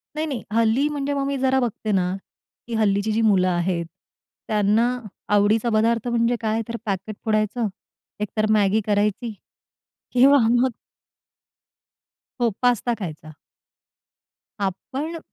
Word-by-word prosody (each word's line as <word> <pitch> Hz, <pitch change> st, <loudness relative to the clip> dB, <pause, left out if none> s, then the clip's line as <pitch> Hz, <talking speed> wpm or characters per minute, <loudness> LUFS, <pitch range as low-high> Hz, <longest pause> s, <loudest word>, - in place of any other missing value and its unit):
नाही-नाही, 305 Hz, -6 st, -3 dB
हल्ली 230 Hz, +6 st, +3 dB
म्हणजे 285 Hz, -1 st, -2 dB
मग 280 Hz, -1 st, -1 dB
मी 280 Hz, -1 st, -1 dB
जरा 265 Hz, 0 st, +2 dB
बघते 225 Hz, -3 st, -2 dB
ना, 185 Hz, -2 st, +1 dB, 0.5 s
की 235 Hz, -, -6 dB
हल्लीची 210 Hz, 0 st, +1 dB
जी 225 Hz, +1 st, +1 dB
मुलं 195 Hz, -4 st, +4 dB
आहेत, 175 Hz, -1 st, 0 dB, 0.6 s
त्यांना 210 Hz, +2 st, +3 dB, 0.5 s
आवडीचा 215 Hz, +3 st, +3 dB
पदार्थ 230 Hz, +2 st, +2 dB
म्हणजे 235 Hz, 0 st, +2 dB
काय, 220 Hz, 0 st, 0 dB
तर 235 Hz, -, -5 dB
पॅकेट 200 Hz, +1 st, -3 dB
फोडायचं, 215 Hz, +1 st, +1 dB, 0.5 s
एकतर 215 Hz, +1 st, -1 dB
मॅगी 210 Hz, 0 st, +3 dB
करायची 210 Hz, +2 st, 0 dB, 0.8 s
किंवा 270 Hz, +3 st, +6 dB
मग 245 Hz, +2 st, +3 dB, 1.7 s
हो, 235 Hz, -, +4 dB
पास्ता 245 Hz, -1 st, +2 dB
खायचा. 155 Hz, -6 st, -7 dB, 1.3 s
आपण 265 Hz, -, -3 dB
220 Hz, 115 wpm, -23 LUFS, 205-245 Hz, 1.7 s, किंवा